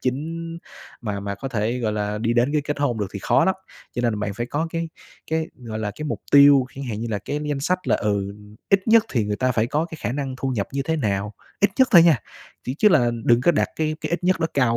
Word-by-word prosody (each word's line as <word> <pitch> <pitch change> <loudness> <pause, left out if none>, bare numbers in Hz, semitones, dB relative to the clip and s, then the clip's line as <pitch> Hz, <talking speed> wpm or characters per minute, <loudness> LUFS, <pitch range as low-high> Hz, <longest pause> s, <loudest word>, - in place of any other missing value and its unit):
chính 165 +6 -3 0.4
mà 105 -4 -3
mà 100 0 -4
có 135 +7 -6
thể, 115 +1 -1
gọi 110 -3 -1
là, 105 0 -2
đi 115 +1 0
đến 120 +4 +2
cái 150 -2 +1
kết 145 0 -3
hôn 125 -6 0
được 100 - -1
thì - - -3
khó - - +3
lắm. 190 - +2 0.4
Cho 120 - -3
nên 110 -4 0
bạn 100 -2 -2
phải 120 +3 -3
có 150 +5 -2
cái 165 0 -3 0.4
cái, 160 0 0
gọi 115 -3 -6
là, 105 -1 -2
cái 155 - -5
mục 150 - -3
tiêu, 140 -2 +8
chẳng 135 +1 -6
hạn 110 -4 -4
như 115 - -3
là 105 - -1
cái 145 +8 -4
danh 140 -2 -2
sách 185 +5 -1
là, - - +4
ừ, 100 -2 -1 0.4
ít 195 +1 +3
nhất 225 0 +6
thì 115 -5 +1
người 105 - -1
ta 130 +2 +1
phải 115 -1 +1
có 150 +6 0
cái 160 -3 -10
khả 120 - -2
năng 135 -2 -3
thu 135 - -2
nhập 105 -6 -2
như 140 0 -1
thế 160 +2 -1
nào, 105 -4 -1 0.3
ít 205 +1 +4
nhất 260 - +5
thôi 170 - +9
nha, 165 -7 +5 0.5
ch 125 - -1
chứ 215 - +6
là 120 -11 +4
đừng 120 0 +4
có 175 - +4
đặt - - +1
cái 155 -1 -1
cái - - -4
ít 175 +1 -2
nhất 185 -1 +2
đó 165 - +2
cao 120 -4 +2
130 Hz, 275 wpm, -23 LUFS, 110-160 Hz, 0.5 s, thôi